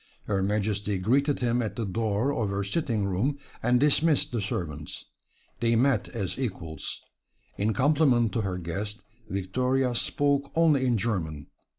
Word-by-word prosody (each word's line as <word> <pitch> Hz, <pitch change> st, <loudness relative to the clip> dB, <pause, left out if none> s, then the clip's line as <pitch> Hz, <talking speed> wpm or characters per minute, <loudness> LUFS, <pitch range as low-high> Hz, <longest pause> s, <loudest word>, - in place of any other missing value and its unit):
Her 100 Hz, -2 st, 0 dB
Majesty 105 Hz, 0 st, 0 dB
greeted 135 Hz, +10 st, +1 dB
him 120 Hz, 0 st, +1 dB
at 110 Hz, -, -3 dB
the 115 Hz, -2 st, -2 dB
door 110 Hz, +6 st, 0 dB
of 110 Hz, -7 st, -1 dB
her 100 Hz, 0 st, -1 dB
sitting 110 Hz, -1 st, -1 dB
room, 105 Hz, +10 st, 0 dB, 0.2 s
and 120 Hz, +1 st, +3 dB
dismissed 150 Hz, +1 st, +3 dB
the 120 Hz, -3 st, -1 dB
servants. 80 Hz, -6 st, -4 dB, 0.5 s
They 115 Hz, 0 st, +2 dB
met 125 Hz, -2 st, +2 dB
as 100 Hz, 0 st, -3 dB
equals. 90 Hz, -11 st, -4 dB, 0.5 s
In 105 Hz, +2 st, 0 dB
compliment 135 Hz, -4 st, +3 dB
to 115 Hz, -, 0 dB
her 95 Hz, -3 st, -2 dB
guest 100 Hz, +5 st, -4 dB, 0.3 s
Victoria 125 Hz, +7 st, 0 dB
spoke 140 Hz, +3 st, +1 dB
only 155 Hz, -5 st, +4 dB
in 120 Hz, -2 st, +2 dB
German. 85 Hz, -10 st, -2 dB
115 Hz, 150 wpm, -27 LUFS, 100-130 Hz, 0.5 s, only